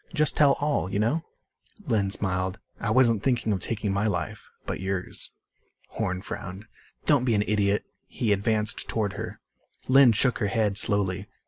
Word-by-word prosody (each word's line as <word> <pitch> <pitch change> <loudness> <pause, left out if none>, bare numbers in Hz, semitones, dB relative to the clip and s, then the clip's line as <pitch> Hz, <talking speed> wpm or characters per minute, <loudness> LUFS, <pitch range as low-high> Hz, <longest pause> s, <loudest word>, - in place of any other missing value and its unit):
Just 150 -1 +2
tell 145 -2 +5
all 145 -10 -1
you - - -1
know?" 120 +10 +1 0.6
Lynn 110 -8 +1
smiled. 95 -1 0 0.2
"I 105 - -2
wasn't 115 -2 +4
thinking 120 -3 +1
of 95 - -1
taking 105 0 -2
my 100 +2 +1
life. 90 -5 -3 0.2
But - - -4
yours." 95 -1 -3 0.6
Horn 90 0 -3
frowned. 95 +3 -7 0.4
"Don't - - +4
be 120 -3 +2
an 105 - +2
idiot." 105 -1 +1 0.2
He 110 -4 0
advanced 105 +1 0
toward 105 -3 -1
her. 105 +1 -6 0.5
Lynn 130 -1 +7
shook 125 +4 +1
her 105 - +1
head 105 0 +1
slowly. 100 -3 +1
105 Hz, 160 wpm, -26 LUFS, 100-115 Hz, 0.6 s, Lynn